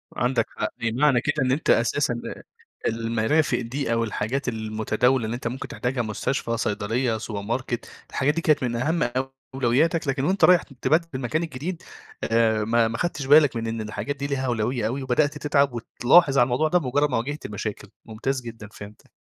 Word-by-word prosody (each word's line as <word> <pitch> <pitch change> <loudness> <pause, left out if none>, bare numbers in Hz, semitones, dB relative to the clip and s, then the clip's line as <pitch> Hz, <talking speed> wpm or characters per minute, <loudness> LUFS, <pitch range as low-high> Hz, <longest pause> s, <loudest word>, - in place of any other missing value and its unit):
عندك 120 -1 +1
حق، 110 - -3
معنى 125 +2 +3
كده 145 -1 0
إن 130 - +1
أنت 145 +4 -1
أساسًا 120 0 +2 0.2
آآ - - -14 0.4
المَرَافِق 115 +7 +1
دي، 120 0 -2
أو 115 0 +1
الحاجات 115 +5 -2
المتداولة 110 +2 0
اللي 115 +2 -3
أنت 120 - -4
ممكن 125 +3 -5
تحتاجها 125 0 -2
مستشفى، 115 +2 -2
صيدلية 110 +3 -1
سوبر 105 -2 -5
ماركت، 120 +2 -3 0.2
الحاجات 140 +2 +1
دي 165 - -2
كانت 155 -5 +2
من 120 -1 -1
أهم 150 +3 0 0.5
أولوياتك، 145 +6 +2
لكن 135 0 0
وأنت 190 +5 +1
رايح 180 -2 +5
تبدّل 160 +5 0
المكان 135 +6 -1
الجديد، 160 +3 -5 0.4
آآ 115 -1 +2
ما 115 +1 +2
ما 115 - -4
خدتش 160 -6 -2
بالك 145 -2 +6
من 115 0 -2
إن 115 0 -3
الحاجات 110 +7 -4
دي 140 0 -4
لها 135 -2 -2
أولوية 120 -1 0
أوي، 130 +4 -3
وبدأت 145 +3 +1
تتعب 140 -3 +2
وتلاحظ 135 +5 +3
على 120 - +7
الموضوع 130 +5 +1
ده 180 +3 +3
بمجرّد 145 +1 +1
ما 125 - 0
واجهت 145 +6 -4
مشاكل، 105 0 -5 0.2
ممتاز 125 +4 -3
جدًا، 115 -2 -9
فهمتك. 105 +1 -12
125 Hz, 180 wpm, -24 LUFS, 115-145 Hz, 0.5 s, على